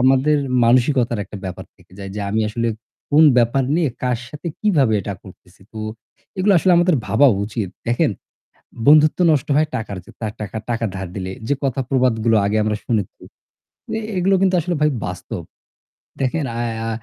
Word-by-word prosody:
আমাদের 135 +4 +4 0.3
মানসিকতার 120 -1 +3
একটা 105 - -10
ব্যাপার 90 -2 -6
থেকে - - -24
যায় 100 -1 -7
যে 105 - -4
আমি 110 +2 +1
আসলে 115 +2 -1 0.4
কোন 150 +2 +6 0.2
ব্যাপার 120 +3 +2
নিয়ে 170 -4 +2
কার 125 -2 0
সাথে 150 +3 -6
কিভাবে 150 - +3
এটা 100 - -4
করতেছি। 90 0 -17
তো 110 - -8 0.6
এগুলো 195 +2 +3
আসলে 185 +2 +3
আমাদের 175 0 +4
ভাবা 140 +6 +4 0.2
উচিত। 105 -2 -4 0.2
দেখেন 120 +5 +2 0.8
বন্ধুত্ব 155 +2 +6
নষ্ট 140 -4 +1
হয় 155 +1 +3
টাকার 105 -3 -4
যে - - -17
তার 110 -2 -3
টাকা 105 +1 -5
টাকার 115 -2 -1
ধার 95 -1 -5
দিলে 95 -1 -4 0.2
যে 145 - +2
কথা 135 -1 -1
প্রবাদগুলো 115 -4 +2
আগে 105 +2 +1
আমরা 105 0 0
শুনেছি, 105 -5 -2 0.8
এ - - -1 0.2
এগুলো 195 +2 +3
কিন্তু 190 -1 +3
আসলে 175 +2 -2
ভাই 150 - +4 0.2
বাস্তব। 90 0 -6 0.8
দেখেন, 140 +4 0
আ - - -2 0.3
আ - - -2
120 Hz, 175 wpm, -20 LUFS, 110-150 Hz, 0.8 s, কোন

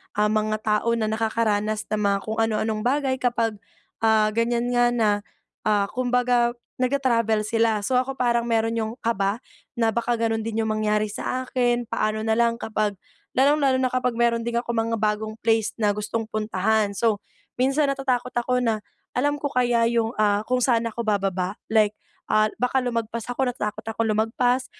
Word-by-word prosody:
ah, 210 0 +2
mga 215 0 +1
tao 215 +2 +1
na 220 -2 0
nakakaranas 215 -1 0
ng 215 - 0
mga 200 0 +2
kung 220 +1 -3
ano-anong 220 -1 0
bagay 265 0 +1
kapag, 230 -3 0 0.5
ah, 220 -1 +4
ganyan 235 +1 +1
nga 245 0 +3
na, 220 -3 +3 0.6
ah, 210 -1 +3
kumbaga 245 -1 +1 0.3
nagtra-travel 235 -5 +1
sila. 225 -1 +2
So 250 +5 +1
ako, 270 +1 -3
parang 235 -1 +2
meron 225 0 +1
'yong 220 +1 -3
kaba 205 -1 0 0.4
na 225 -1 +3
baka 235 0 +1
gano'n 225 -1 +1
din 225 0 -1
'yong 220 - -2
mangyari 215 0 0
sa 255 +4 -3
akin. 245 -1 +1
Paano 215 0 -1
na 220 - +1
lang 235 0 +3
kapag, 215 -2 -1 0.4
lalong-lalo 275 0 +4
na 255 - +1
kapag 250 -1 0
meron 235 -1 +2
din 235 - -2
akong 235 -1 -4
mga 230 0 0
bagong 215 0 -1
place 225 -1 +2
na 210 -2 +3
gustong 215 +2 -2
puntahan. 215 0 0
So, 220 -1 +1 0.4
minsan 275 +3 +2
natatakot 255 -2 -1
ako 250 +1 +1
na, 225 -2 +1 0.4
alam 290 +3 +2
ko 285 - -2
kaya 245 -2 +2
'yong, 230 0 0
ah, 205 -1 +2
kung 255 0 +1
saan 235 -3 +2
ako 235 +1 -5
bababa? 195 -2 0 0.2
Like, 215 -2 +4 0.4
ah, 215 0 +3
baka 250 +1 +1
lumagpas 230 -1 -2
ako, 260 +2 0
natatakot 210 -4 -4
ako 225 0 -3
lumagpas, 245 +4 +1
230 Hz, 170 wpm, -24 LUFS, 215-245 Hz, 0.6 s, ah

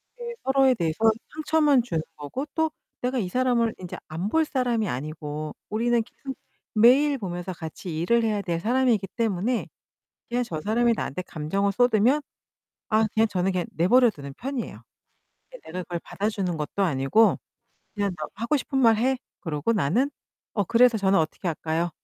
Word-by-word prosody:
이게 475 -1 -6
서로에 265 -1 +4
대해서 165 -7 -1 0.4
상처만 305 -3 +3
주는 165 -9 -2
거고 150 - -5
또 320 -1 +1 0.3
내가 255 +1 -1
이 185 - -2
사람을 240 0 +2
인제 180 -2 -7
안 165 +6 -3
볼 320 +6 +3
사람이 245 -6 0
아니고 150 +2 -5
우리는 235 +2 +2
계속 265 +3 -9 0.4
매일 265 +6 +5
보면서 185 -4 -5
같이 160 0 -6
일을 235 +8 +2
해야 215 -2 0
될 170 -4 -2
사람이기 235 -1 +2
때문에 225 +1 0 0.6
그냥 245 +1 0
저 160 -9 -5
사람이 235 +5 +2
나한테 185 -4 -3
감정을 180 +5 -1
쏟으면 245 +5 +3 0.7
아 220 0 +4
그냥 220 +1 +3
저는 190 -2 0
그냥 180 -2 -1
내버려 240 +9 +4
두는 140 -8 -8
편이에요. 265 -1 -5 0.8
내가 180 +2 -5
그걸 175 -1 -4
받아주는 195 -4 -2
것도 155 +6 -1
아니고 165 +7 +3 0.6
그냥 200 -2 0
'너 155 - -4
하고 230 +7 0
싶은 270 0 -2
말 230 -4 +5
해.' 260 +4 +2 0.2
그러고 160 +4 -1
나는 220 - +1 0.4
'어, 205 - +1
그래서 235 +3 +4
저는 195 -1 +3
어떻게 160 +3 -1
할까요?' 165 +1 -1
215 Hz, 345 characters per minute, -25 LUFS, 175-250 Hz, 0.8 s, 매일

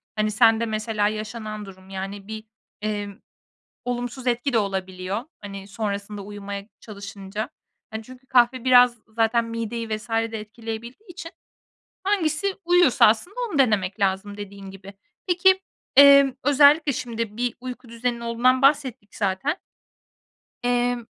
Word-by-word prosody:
hani, 215 0 0
sende 225 +1 +4
mesela 215 -1 0
yaşanan 215 0 -5
durum, 190 -1 -14
yani, 195 +1 -6
bir, 220 0 -6 0.4
emm, 205 -1 -4 0.7
olumsuz 245 +1 -4
etki 245 +2 0
de - - +4
olabiliyor, 190 +1 -3 0.2
hani, 195 -1 -8
sonrasında 200 0 -4
uyumaya 200 0 -7
çalışınca. 200 0 -7 0.4
Hani, 220 0 -5
çünkü 255 +2 -15
kahve 245 -1 +3
biraz 245 -1 +6
zaten 225 +1 +1
mideyi 230 0 -4
vs. 215 +2 -4
de 225 0 -1
etkileyebildiği 230 - -8
için 330 -1 -8 0.7
hangisi 380 -1 0
uyuyorsa 350 -7 +5
aslında 230 - 0
onu 310 - -3
denemek 210 -6 +2
lazım 200 +1 -1
dediğin 200 -1 -9
gibi. 195 +1 -12 0.3
Peki, 370 +1 +4 0.4
emm, 280 -1 +8
özellikle 285 +2 +5
şimdi 230 -3 -4
bir 245 -1 0
uyku 250 -1 -8
düzenin 235 +1 -2
olduğundan 240 +2 +2
bahsettik 265 -6 +1
zaten 205 - -1 1.1
Emm, 245 -1 +1
225 Hz, 125 wpm, -24 LUFS, 205-255 Hz, 1.1 s, emm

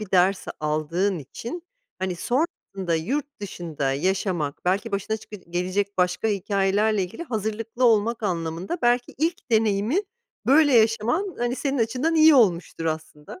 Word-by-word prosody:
bir 210 -3 -7
ders 185 +1 +3
aldığın 160 +5 0
için, 235 - -7 0.4
hani, 185 -2 -2
sonrasında 195 - -2
yurt 275 - -3
dışında 160 -8 -3
yaşamak, 175 -1 -1
belki 200 +4 0
başına 205 +2 -1
çıkı 215 -1 -10
gelecek 185 +2 -2
başka 180 +4 +1
hikâyelerle 200 +1 +1
ilgili 185 - -6
hazırlıklı 225 - -2
olmak 230 0 +3
anlamında 175 - -2
belki 240 0 +2
ilk 325 -4 -2
deneyimi 220 - +2 0.5
böyle 290 +1 +5
yaşaman, 230 - +2
hani, 240 +1 -1
senin 275 -2 -1
açından 250 +8 0
iyi 315 -1 +7
olmuştur 175 -8 +2
aslında. 155 +1 -5
205 Hz, 135 wpm, -24 LUFS, 180-240 Hz, 0.5 s, iyi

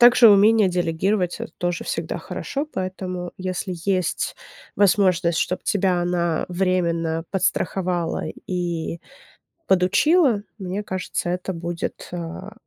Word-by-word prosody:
Также 240 -1 +8
умение 210 +1 +6
делегировать- 180 +2 0
это - - -6
тоже 175 -1 -2
всегда - - -3
хорошо. 280 +2 -4
Поэтому 185 -1 -4 0.2
если 185 +1 -3 0.2
есть 185 -3 0 0.4
возможность, 185 -4 +3
чтоб 180 - -1
тебя 190 -3 +2
она 175 -2 0
временно 170 -3 0
подстраховала 180 -2 0 0.3
и 170 -2 -2 0.7
подучила, 215 - +4 0.2
мне 195 +1 -4
кажется, 185 -2 -3
это 180 +2 -2
будет, 170 0 -5
а, 175 +4 -6
180 Hz, 110 wpm, -23 LUFS, 175-195 Hz, 0.7 s, Также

